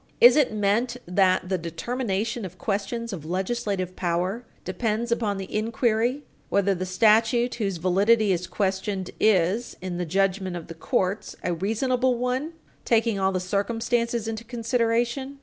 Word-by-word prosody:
Is 245 +1 +9
it 295 -5 +3
meant 215 +4 +1
that 185 0 +2
the 185 -1 -1
determination 220 +6 -2
of 185 - -7
questions 220 +2 -3
of 165 -6 -6
legislative 185 +1 -2
power 180 +6 -1 0.2
depends 220 +5 -1
upon 215 -4 0
the 195 +1 -6
inquiry 230 +4 +1 0.3
whether 200 0 +2
the 185 0 -4
statute 225 +5 +3
whose 195 -4 -1
validity 200 +5 +3
is 180 -1 -1
questioned 190 -1 -2
is, 210 +2 +2
in 180 -1 -4
the 180 - -1
judgment 190 +1 0
of 170 -2 -6
the - - -5
courts, 190 +3 -1
a 175 - 0
reasonable 245 +7 +1
one, 255 +6 -2 0.3
taking 225 -3 +2
all 190 0 +2
the 185 - -1
circumstances 225 +4 -1
into 225 0 -4
consideration? 240 +3 -1
210 Hz, 150 wpm, -25 LUFS, 185-235 Hz, 0.3 s, Is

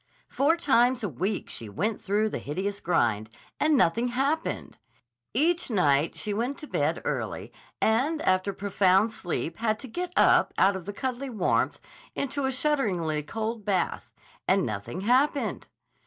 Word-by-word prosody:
Four 290 +5 +2
times 250 -5 +3
a 205 - 0
week 185 - -2
she 115 - -6
went 205 - -2
through 210 +2 +1
the - - -4
hideous 195 +7 -3
grind, 115 - +1 0.3
and 305 -1 +3
nothing 230 +3 +3
happened. 275 +6 -2 0.5
Each 330 +6 +1
night 150 - +2
she 210 - -3
went 245 +6 -2
to 300 - -9
bed - - -1
early - - -3 0.3
and 265 +9 +2
after 185 +1 +2
profound 195 +1 +2
sleep 170 -4 -3
had 220 -1 +1
to 260 - -9
get 355 +9 -4
up - - +4
out 195 +1 +4
of 185 -3 -6
the 205 - -5
cuddly 260 +3 -3
warmth 210 -7 0 0.4
into 280 0 -2
a 265 - +1
shudderingly 205 - 0
cold 220 +7 -4
bath—and 190 -4 -1
nothing 110 - -4
happened. 265 +7 +1
215 Hz, 150 wpm, -27 LUFS, 185-265 Hz, 0.5 s, up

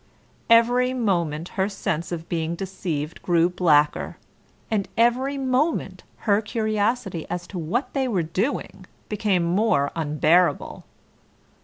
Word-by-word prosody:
Every 245 +2 +4
moment 170 -8 -1
her 190 +1 -1
sense 170 -4 -3
of 165 -1 -5
being 165 0 -2
deceived 170 -5 -4
grew 170 -1 +3
blacker, 150 -5 +2 0.5
and 205 -3 0
every 255 +4 +2
moment 270 +4 0 0.2
her 205 -1 +3
curiosity 215 -4 -1
as 175 0 -4
to 185 - -5
what 175 - -2
they 270 -2 0
were 195 -8 0
doing 190 - -3 0.2
became 205 -4 +1
more 170 -5 +2
unbearable. 160 +3 +1
190 Hz, 120 wpm, -24 LUFS, 170-230 Hz, 0.5 s, Every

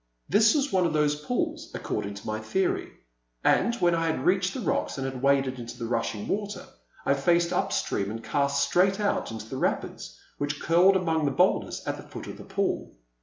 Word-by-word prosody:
This 215 - +5
was 285 -1 +1
one 185 -2 +3
of 160 - -3
those 150 -1 +3
pools, 310 - -3
according 100 0 -3
to 100 - -10
my 110 0 -2
theory; 180 - -1 0.5
and 235 - +3
when 175 -7 +2
I 165 0 +1
had 160 - -1
reached 185 +2 +2
the - - -3
rocks 180 - -1
and 135 - -3
had 130 -1 -4
waded 135 -2 +2
into 120 0 -8
the 120 - -4
rushing 115 -3 -2
water, 205 0 -3 0.4
I - - +4
faced 170 +5 +2
up - - 0
stream 100 0 -1
and 115 +2 -6
cast 140 -1 +1
straight 185 +7 +3
out 205 -1 0
into 110 -1 -7
the 130 - -5
rapids - - -2 0.2
which 145 +1 -2
curled 180 +4 +5
among 160 -4 +1
the - - +3
boulders 135 - +1
at - - -2
the - - -8
foot - - -7
of - - -8
the - - -10
pool. - - -2
150 Hz, 210 wpm, -27 LUFS, 130-190 Hz, 0.5 s, This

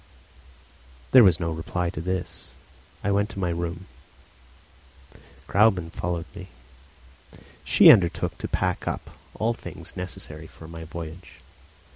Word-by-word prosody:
There 130 -2 +9
was 90 -5 +5
no 85 -1 -2
reply 85 +2 -2
to 85 - -5
this. 90 0 -4 0.5
I 100 - +1
went 100 +1 +1
up - - -9
to - - -6
my 90 -2 0
room. 85 +1 -4 1.6
Gräuben 95 -6 +3
followed 85 -1 -3
me. 95 -2 -9 1.2
She - - +8
undertook 90 -5 +2
to - - -3
pack - - -1
up - - -4 0.2
all 115 +2 0
things 90 -7 -9
necessary 80 -4 -5
for 80 - -13
my 80 0 -8
voyage. 85 +2 -9
90 Hz, 130 wpm, -25 LUFS, 85-95 Hz, 1.6 s, There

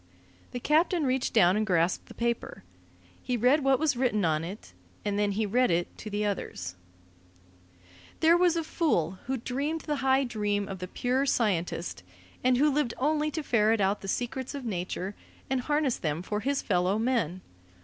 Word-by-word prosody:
The 245 - -5
captain 315 +4 +2
reached 260 0 0
down 185 -4 +5
and 215 - +1
grasped 180 -4 +1
the - - -12
paper. 235 - -2 0.6
He 250 - -1
read 260 +6 +3
what 270 -1 +4
was 300 -2 +1
written 240 -6 +1
on 155 -1 +1
it, 170 - -8 0.3
and 205 0 0
then 205 -1 +1
he 215 +2 0
read 245 +5 +2
it 170 0 0
to 215 - -6
the 210 0 -1
others: 90 - -3 1.5
There 325 +1 +6
was 350 -1 +3
a 330 - 0
fool 190 - 0
who 265 0 0
dreamed 280 +7 -2
the 295 -2 -2
high 265 0 +3
dream 205 -4 -1
of 190 - -6
the 185 - -5
pure 255 +7 0
scientist, 180 - 0 0.4
and 255 0 +4
who 295 +3 +4
lived 280 -5 0
only 300 +2 +1
to 310 +1 -4
ferret 225 -4 +3
out 195 +1 +1
the 195 - -7
secrets 250 +6 -3
of 275 -3 -6
nature, 185 -1 -3 0.4
and 265 -1 +1
harness 295 -1 +1
them 155 +1 -2
for 210 +3 -2
his 275 +5 -1
fellow 185 0 +1
men. 220 -7 0
235 Hz, 180 wpm, -28 LUFS, 195-270 Hz, 1.5 s, There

